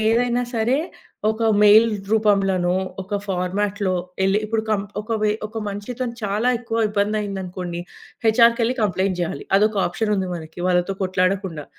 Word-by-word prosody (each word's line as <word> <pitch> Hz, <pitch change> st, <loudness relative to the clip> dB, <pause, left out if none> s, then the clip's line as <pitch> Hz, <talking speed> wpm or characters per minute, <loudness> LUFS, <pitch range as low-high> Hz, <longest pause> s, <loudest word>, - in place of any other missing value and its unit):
ఏదైనా 240 Hz, +2 st, +2 dB
సరే 230 Hz, +4 st, +2 dB, 0.5 s
ఒక 220 Hz, +1 st, -3 dB, 0.2 s
మెయిల్ 215 Hz, +2 st, +7 dB, 0.3 s
రూపంలోనో, 195 Hz, -4 st, +2 dB, 0.3 s
ఒక 205 Hz, +2 st, -3 dB
ఫార్మాట్‌లో 195 Hz, +1 st, -1 dB, 0.3 s
యెళ్లి, 195 Hz, +2 st, +3 dB
ఇప్పుడు 220 Hz, 0 st, -1 dB
కం 205 Hz, -2 st, +1 dB, 0.2 s
ఒక 215 Hz, +2 st, -5 dB
వే 210 Hz, -, +3 dB, 0.2 s
ఒక 220 Hz, +1 st, -7 dB
మనిషితో‌ని 235 Hz, +4 st, -5 dB
చాలా 210 Hz, +5 st, 0 dB
ఎక్కువ 230 Hz, -1 st, -2 dB
ఇబ్బంది 210 Hz, +1 st, 0 dB
అయిందనుకోండి, 185 Hz, -3 st, -5 dB, 0.5 s
హెచ్‌ఆర్‌కెళ్ళి 230 Hz, +2 st, +4 dB
కంప్లెయింట్ 190 Hz, -2 st, 0 dB
జేయాలి. 165 Hz, -5 st, -3 dB
అదొక 215 Hz, +1 st, +2 dB
ఆప్షనుంది 195 Hz, 0 st, -1 dB
మనకి. 160 Hz, 0 st, -9 dB
వాళ్ళతో 180 Hz, +2 st, +1 dB
కొట్లాడకుండా, 185 Hz, -3 st, -1 dB
205 Hz, 130 wpm, -22 LUFS, 185-220 Hz, 0.5 s, మెయిల్